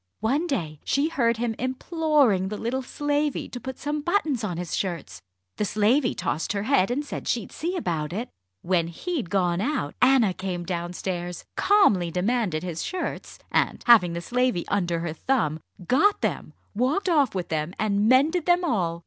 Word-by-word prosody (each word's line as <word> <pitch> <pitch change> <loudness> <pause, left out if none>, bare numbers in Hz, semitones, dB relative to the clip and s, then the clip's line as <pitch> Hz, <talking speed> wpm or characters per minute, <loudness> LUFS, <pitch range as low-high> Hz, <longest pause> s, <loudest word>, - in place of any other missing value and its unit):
One 275 +10 +1
day 160 - -3
she 285 +3 +1
heard 235 -7 +1
him 235 0 -1
imploring 260 - +1
the 210 +2 -4
little 245 +5 -2
slavey 290 +2 -1
to 245 - -6
put 260 +1 -7
some 295 +1 -3
buttons 310 - 0
on 180 -5 -2
his 175 -2 -3
shirts. 175 -5 -4 0.4
The - - 0
slavey 230 +6 +2
tossed 160 - -2
her 200 -1 -2
head, 220 -5 +3
and 280 +5 -1
said - - -6
she'd 235 -5 -1
see 350 +4 -3
about 160 - -2
it. 220 +7 -3 0.4
When 170 -2 +1
he'd 245 - -4
gone 180 -2 +1
out, 245 - -1
Anna 250 -6 +5
came 180 -2 -4
downstairs, 175 0 -4
calmly 295 - +4
demanded 180 -2 0
his 170 -3 -4
shirts, 370 0 -4
and, - - +1
having 210 -8 +6
the 170 - -3
slavey 245 -3 0
under 175 -4 0
her 170 -2 -3
thumb, 160 - 0 0.3
got 400 +11 +3
them, - - -2 0.2
walked 260 - 0
off 290 - +3
with 180 -2 -3
them, 160 +2 -2
and 205 0 +1
mended 300 +7 +3
them 350 0 +4
all. 180 - 0
225 Hz, 175 wpm, -25 LUFS, 175-280 Hz, 0.4 s, having